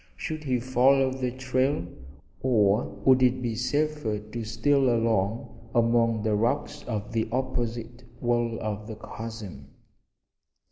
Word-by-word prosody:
Should 155 Hz, -6 st, -5 dB
he 130 Hz, -2 st, +1 dB
follow 130 Hz, +2 st, +3 dB
the 130 Hz, -1 st, -2 dB
trail, 130 Hz, -3 st, 0 dB, 0.6 s
or 110 Hz, -4 st, +3 dB, 0.2 s
would 130 Hz, -1 st, +6 dB
it 125 Hz, 0 st, +4 dB
be 120 Hz, -2 st, -2 dB
safer 130 Hz, -1 st, -1 dB
to 110 Hz, +2 st, -6 dB
steal 130 Hz, +5 st, +2 dB
along 115 Hz, 0 st, -1 dB
among 115 Hz, -1 st, +3 dB
the 110 Hz, -1 st, +1 dB
rocks 115 Hz, +3 st, 0 dB
of 105 Hz, -3 st, -3 dB
the 115 Hz, -1 st, -1 dB
opposite 120 Hz, -1 st, -3 dB, 0.2 s
wall 120 Hz, -1 st, 0 dB
of 105 Hz, -1 st, -4 dB
the 110 Hz, -, -6 dB
chasm? 110 Hz, -9 st, -8 dB
120 Hz, 130 wpm, -27 LUFS, 110-130 Hz, 0.6 s, would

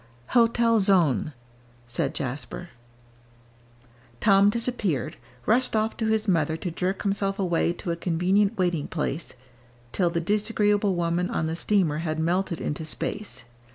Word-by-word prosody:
"Hotel 230 Hz, -1 st, +4 dB
Sonne," 165 Hz, -, +2 dB, 0.5 s
said 135 Hz, +4 st, -2 dB
Jasper. 135 Hz, +6 st, -5 dB, 1.5 s
Tom 200 Hz, -1 st, +5 dB
disappeared 210 Hz, -, -1 dB, 0.3 s
rushed 245 Hz, +2 st, +2 dB
off 220 Hz, +1 st, +1 dB
to 220 Hz, -, -1 dB
his 220 Hz, 0 st, +1 dB
mother 160 Hz, -4 st, +1 dB
to 175 Hz, -, -4 dB
jerk 185 Hz, +3 st, -2 dB
himself 195 Hz, -1 st, 0 dB
away 175 Hz, -3 st, +1 dB
to 175 Hz, 0 st, -4 dB
a -, -, -1 dB
convenient 185 Hz, +4 st, +1 dB
waiting 175 Hz, -5 st, 0 dB
place 160 Hz, +4 st, -3 dB, 0.6 s
till 180 Hz, -3 st, +1 dB
the 170 Hz, 0 st, -1 dB
disagreeable 205 Hz, +1 st, +1 dB
woman 175 Hz, +1 st, 0 dB
on -, -, -1 dB
the 160 Hz, +1 st, -2 dB
steamer 170 Hz, -4 st, +1 dB
had 160 Hz, -1 st, -2 dB
melted 170 Hz, +2 st, 0 dB
into 150 Hz, +2 st, -3 dB
space. 155 Hz, -, -4 dB
180 Hz, 135 wpm, -26 LUFS, 165-205 Hz, 1.5 s, Tom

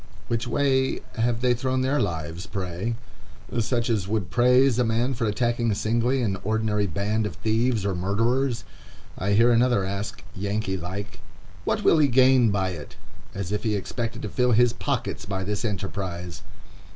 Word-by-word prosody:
Which 115 Hz, +1 st, -1 dB
way 130 Hz, +1 st, +1 dB, 0.2 s
have 115 Hz, 0 st, 0 dB
they 125 Hz, -1 st, +3 dB
thrown 130 Hz, +1 st, -1 dB
their 135 Hz, +3 st, +1 dB
lives, 80 Hz, +1 st, -3 dB
pray?—Such 115 Hz, +5 st, -4 dB
as 110 Hz, -6 st, 0 dB
would 100 Hz, -6 st, -2 dB
praise 125 Hz, +1 st, +4 dB
a -, -, +4 dB
man 120 Hz, +3 st, +1 dB
for 115 Hz, -1 st, -1 dB
attacking 120 Hz, +1 st, 0 dB
singly 120 Hz, +5 st, +1 dB
an 100 Hz, -4 st, 0 dB
ordinary 105 Hz, -1 st, 0 dB
band 105 Hz, +5 st, -1 dB
of -, -, -7 dB
thieves 110 Hz, -1 st, 0 dB
or 100 Hz, -, +1 dB
murderers. 115 Hz, +8 st, 0 dB, 0.5 s
I 100 Hz, +3 st, -1 dB
hear 115 Hz, +4 st, +5 dB
another 120 Hz, -4 st, +3 dB
ask, 100 Hz, +5 st, -4 dB
Yankee 100 Hz, 0 st, -2 dB
like, 95 Hz, +4 st, -6 dB, 0.5 s
"What -, -, 0 dB
will 160 Hz, -, +5 dB
he 150 Hz, -, +5 dB
gain 130 Hz, -2 st, +5 dB
by 95 Hz, -2 st, 0 dB
it?" 75 Hz, -5 st, -8 dB, 0.4 s
as 95 Hz, -1 st, -4 dB
if 105 Hz, -, -1 dB
he 110 Hz, -2 st, 0 dB
expected 115 Hz, +4 st, -4 dB
to 105 Hz, -, -3 dB
fill 125 Hz, +3 st, +2 dB
his 120 Hz, +1 st, +4 dB
pockets -, -, -3 dB
by 95 Hz, -1 st, -2 dB
this 105 Hz, +3 st, -2 dB
enterprise. 95 Hz, -4 st, -4 dB
110 Hz, 165 wpm, -25 LUFS, 100-120 Hz, 0.5 s, hear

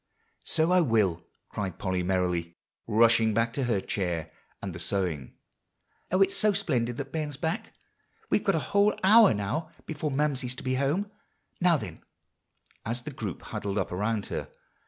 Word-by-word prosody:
"So 160 Hz, +1 st, +2 dB
I 180 Hz, 0 st, +5 dB
will," 105 Hz, -, +2 dB, 0.3 s
cried 95 Hz, -4 st, -4 dB
Polly 95 Hz, -1 st, -1 dB
merrily, 90 Hz, -2 st, -1 dB, 0.3 s
rushing 115 Hz, 0 st, +4 dB
back 115 Hz, +1 st, +1 dB
to 135 Hz, -, -1 dB
her 115 Hz, -5 st, +1 dB
chair 85 Hz, -5 st, -3 dB, 0.3 s
and 95 Hz, -3 st, -5 dB
the 80 Hz, -, -7 dB
sewing. 85 Hz, -7 st, -2 dB, 0.8 s
"Oh, 185 Hz, +2 st, +5 dB
it's 195 Hz, 0 st, 0 dB
so 210 Hz, -1 st, +3 dB
splendid 125 Hz, -11 st, 0 dB
that 140 Hz, 0 st, -5 dB
Ben's 150 Hz, -3 st, -3 dB
back! 160 Hz, +3 st, -3 dB, 0.6 s
We've -, -, +3 dB
got -, -, +2 dB
a -, -, -2 dB
whole 205 Hz, +1 st, +4 dB
hour 215 Hz, -, +8 dB
now 120 Hz, +11 st, -2 dB, 0.2 s
before 155 Hz, -1 st, -3 dB
Mamsie's 135 Hz, -3 st, 0 dB
to -, -, -9 dB
be 130 Hz, -, 0 dB
home. 150 Hz, +10 st, 0 dB, 0.5 s
Now, 175 Hz, -2 st, +4 dB
then," -, -, -8 dB, 0.8 s
as 120 Hz, +2 st, -2 dB
the 150 Hz, -, -6 dB
group 105 Hz, -, -5 dB
huddled 100 Hz, 0 st, -4 dB
up 95 Hz, -, -1 dB
around 105 Hz, +3 st, -1 dB
her. -, -, -3 dB
115 Hz, 165 wpm, -28 LUFS, 95-155 Hz, 0.8 s, hour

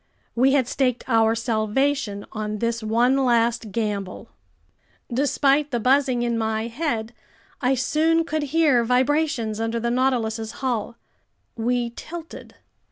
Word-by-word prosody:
We 260 Hz, +3 st, +3 dB
had 265 Hz, -4 st, +2 dB
staked 250 Hz, -2 st, 0 dB
our 225 Hz, -2 st, +3 dB
salvation 230 Hz, 0 st, -1 dB
on 215 Hz, -1 st, -4 dB
this 230 Hz, +1 st, -1 dB
one 235 Hz, +4 st, +2 dB
last 235 Hz, -3 st, +1 dB
gamble. 205 Hz, -4 st, -3 dB, 0.8 s
Despite 280 Hz, +2 st, +2 dB
the 240 Hz, -4 st, -1 dB
buzzing 255 Hz, 0 st, +2 dB
in 235 Hz, -1 st, 0 dB
my 220 Hz, 0 st, -1 dB
head, 235 Hz, -3 st, -3 dB, 0.5 s
I 265 Hz, 0 st, +2 dB
soon 315 Hz, +6 st, +2 dB
could 310 Hz, -1 st, -2 dB
hear 295 Hz, -6 st, +3 dB
vibrations 250 Hz, -2 st, +1 dB
under 225 Hz, +1 st, -1 dB
the 235 Hz, +1 st, -1 dB
Nautilus's 235 Hz, -3 st, 0 dB
hull. 235 Hz, -3 st, -2 dB, 0.6 s
We 240 Hz, +1 st, -1 dB
tilted. 330 Hz, +6 st, -9 dB
240 Hz, 125 wpm, -23 LUFS, 225-270 Hz, 0.8 s, We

